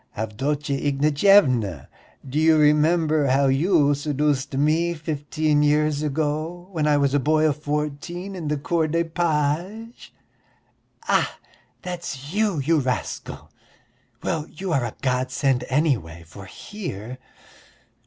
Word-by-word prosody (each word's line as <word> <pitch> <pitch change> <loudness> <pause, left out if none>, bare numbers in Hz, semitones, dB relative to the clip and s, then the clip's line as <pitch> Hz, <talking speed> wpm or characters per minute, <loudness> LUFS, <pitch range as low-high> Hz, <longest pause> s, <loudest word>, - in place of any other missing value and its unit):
Avdotya 140 +7 -2
Ignatyevna, 140 - +3 0.4
do 140 +4 -2
you 160 0 +5
remember 155 0 +3
how 135 +2 +3
you 145 +2 +3
seduced 145 -1 -1
me 160 +4 +1
fifteen 155 -1 -1
years 150 0 +2
ago 155 +4 -2
when 155 -4 -1
I 150 -1 +4
was 140 -1 +1
a 145 - +3
boy 155 +3 +2
of 150 -1 0
fourteen 150 +6 -4
in 170 -4 -5
the 150 0 0
Corps 160 +3 0
des 165 +2 0
Pages?" 170 - -2 1.0
"Ah, - - +1 0.5
that's 170 -5 -6
you, 210 -4 +1
you 150 +3 +2
rascal! 130 -2 -4 0.7
Well, 160 -1 -2
you 180 +2 -4
are 135 -5 +1
a 115 - -6
godsend, 130 0 0
anyway, 125 - 0
for 100 +5 -12
here...." 130 - -7
150 Hz, 125 wpm, -23 LUFS, 135-160 Hz, 1.0 s, you